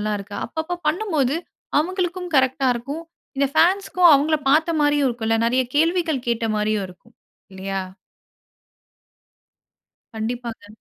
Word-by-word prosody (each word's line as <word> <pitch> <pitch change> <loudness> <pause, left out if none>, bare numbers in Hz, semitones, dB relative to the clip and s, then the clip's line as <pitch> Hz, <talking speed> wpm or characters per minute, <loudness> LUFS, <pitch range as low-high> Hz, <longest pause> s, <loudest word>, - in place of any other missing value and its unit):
எல்லாம் 210 0 -1
இருக்கா? 205 +1 -8
அப்பப்ப 320 +7 -4
பண்ணும்போது, 310 - 0 0.4
அவுங்களுக்கும் 360 +1 -2
கரெக்ட்டா 265 0 +2
இருக்கும். 280 +8 -6 0.3
இந்த 280 0 +2
ஃபேன்ஸ்க்கும் 365 -1 +4
அவுங்கள 305 +3 +3
பாத்தமாரியும் 295 -2 +3
இருக்குன்ல. 225 -2 -1
நிறைய 255 +2 +2
கேள்விகள் 325 -4 +1
கேட்டமாரியும் 215 -3 0
இருக்கும், 180 +6 -18 0.4
இல்லயா! 195 0 -4 2.4
கண்டிப்பாங்க. 230 -1 -5
275 Hz, 100 wpm, -22 LUFS, 225-325 Hz, 2.4 s, ஃபேன்ஸ்க்கும்